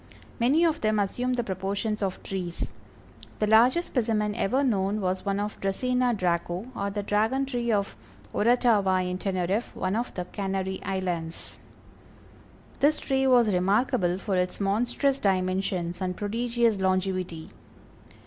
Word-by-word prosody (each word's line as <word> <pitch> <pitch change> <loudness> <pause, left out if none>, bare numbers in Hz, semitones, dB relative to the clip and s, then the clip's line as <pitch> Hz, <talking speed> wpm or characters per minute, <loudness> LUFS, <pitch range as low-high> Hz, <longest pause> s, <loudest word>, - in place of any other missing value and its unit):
Many 280 +8 +4
of 325 -1 +1
them 215 0 +2
assume 245 +5 0
the 245 -1 0
proportions 200 +2 -2
of 190 -2 -3
trees. 180 -3 -4 0.6
The 215 - +1
largest 240 +10 +4
specimen 220 -4 0
ever 235 +5 +1
known 205 -4 +1
was 185 -1 -1
one 200 0 -1
of 210 +1 -4
Dracæna 250 +4 +1
Draco, 175 +1 -1
or 200 0 -2
the 205 0 -3
Dragon 220 +7 +1
tree 240 -3 -1
of 200 -2 0 0.4
Oratava 205 -5 +3
in 180 0 -3
Teneriffe, 190 +3 -1
one 185 +2 -1
of 240 +2 -2
the 180 - -3
Canary 190 -1 -3
Islands. 175 -4 -4 1.2
This 300 +2 +4
tree 270 -1 0
was 240 -5 +5
remarkable 190 0 +2
for 195 0 -2
its 180 0 -1
monstrous 245 +7 +1
dimensions 185 -2 0
and 180 -1 -2
prodigious 230 0 0
longevity. 185 -3 -1
200 Hz, 140 wpm, -27 LUFS, 185-235 Hz, 1.2 s, was